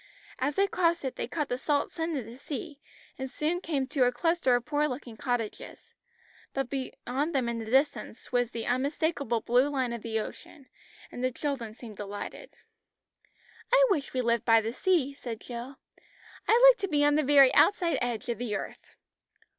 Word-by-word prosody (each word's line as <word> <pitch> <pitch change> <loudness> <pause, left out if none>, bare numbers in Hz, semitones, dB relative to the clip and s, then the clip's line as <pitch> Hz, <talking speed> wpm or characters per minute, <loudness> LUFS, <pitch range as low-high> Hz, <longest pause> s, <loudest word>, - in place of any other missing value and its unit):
As 280 +3 0
they 395 - +4
crossed 340 -5 +1
it, 260 - -3
they - - -3
caught 300 -3 -2
the 245 -1 -3
salt 290 0 0
scent 325 -1 -2
of 250 - -4
the 235 +3 -11
sea, 290 0 -6 0.4
and 265 0 -4
soon 315 +6 -1
came 285 -7 -1
to 265 -1 +2
a 245 - +3
cluster 265 0 +2
of 245 - -1
poor 300 0 +1
looking 250 -4 -6
cottages, 240 -2 -4 0.6
but 270 -2 -2
beyond 275 +2 -3
them 255 -3 +1
in 235 -1 -2
the 225 - -5
distance 260 -4 0
was 245 -2 +1
the 230 -2 -5
unmistakable 275 -1 0
blue 250 +5 +3
line 260 -4 -1
of 235 - -5
the 225 -1 -2
ocean, 265 +5 -9 0.5
and 245 - -6
the 255 - +1
children 255 -5 -4
seemed 225 -4 -11
delighted. 205 - -7 1.2
"I - - +7
wish 295 -8 0
we 255 - 0
lived 235 -1 +1
by 225 -1 +5
the 225 +1 -3
sea," 300 -3 +1
said 235 -5 -7
Jill. 245 +3 -7 0.7
"I 485 +2 +7
like - - -7
to 395 - -1
be 295 -4 +2
on 290 - +4
the 305 - +3
very 275 -2 +6
outside 360 -4 +4
edge 240 -2 -2
of 235 -1 -2
the 235 -4 -2
earth." - - -7
265 Hz, 190 wpm, -29 LUFS, 240-300 Hz, 1.2 s, I